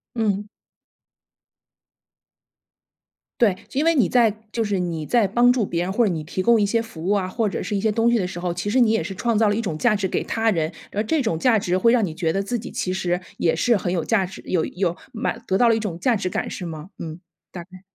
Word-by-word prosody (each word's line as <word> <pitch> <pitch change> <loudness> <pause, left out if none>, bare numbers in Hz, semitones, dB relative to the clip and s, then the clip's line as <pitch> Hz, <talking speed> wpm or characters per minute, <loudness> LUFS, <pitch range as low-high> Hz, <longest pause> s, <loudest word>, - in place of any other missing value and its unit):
嗯。 210 -3 0 2.9
对， 205 -6 +4 0.2
因 280 - +1
为 330 +1 +3
你 245 -10 +4
在 235 -3 +4 0.2
就 230 - -1
是 205 -2 -1
你 170 -3 -2
在 230 +7 +2
帮 240 +5 +4
助 245 -4 +1
别 170 -2 -2
人， 180 +2 -2
或 235 +4 +2
者 195 - +1
你 155 -2 -4
提 185 +4 -3
供 235 -1 +4
一 - - +3
些 230 +3 +1
服 225 -8 -7
务 205 - +3
啊， 190 -2 -1
或 215 +2 -1
者 - - -4
是 210 - -3
一 195 - 0
些 220 +1 +2
东 230 +2 +2
西 235 - +3
的 185 - -1
时 180 -1 -7
候， 175 -1 -2
其 180 +4 -3
实 255 - +2
你 235 -3 +5
也 225 - +2
是 195 - -5
创 230 +3 0
造 215 -1 +3
了 205 - +1
一 225 - -1
种 190 -8 -3
价 225 +2 +3
值 195 -2 -1
给 - - -1
他 225 0 0
人， 160 -4 -1 0.2
而 210 - -1
这 285 +5 0
种 165 -8 -1
价 230 +4 +4
值 180 -3 0
会 230 +5 +4
让 235 -3 +3
你 165 - -5
觉 165 0 -1
得 195 +3 -1
自 235 +4 -2
己 - - -8
其 185 - -2
实 180 -1 -1 0.2
也 165 - +1
是 235 +8 +3
很 185 -3 -1
有 170 -3 -1
价 195 -3 +1
值， 190 - -11
有 170 -4 0
有 180 -2 -2 0.2
满 235 +1 -3
得 190 - +2
到 240 - +4
了 230 - +4
一 - - 0
种 205 -6 -4
价 245 +2 +2
值 195 -3 -2
感 - - -2
是 180 - -5
吗？ 160 +3 -8
嗯， 160 0 -6 0.3
大 175 - -7
概。 185 +1 -15
200 Hz, 285 characters per minute, -22 LUFS, 180-230 Hz, 2.9 s, 你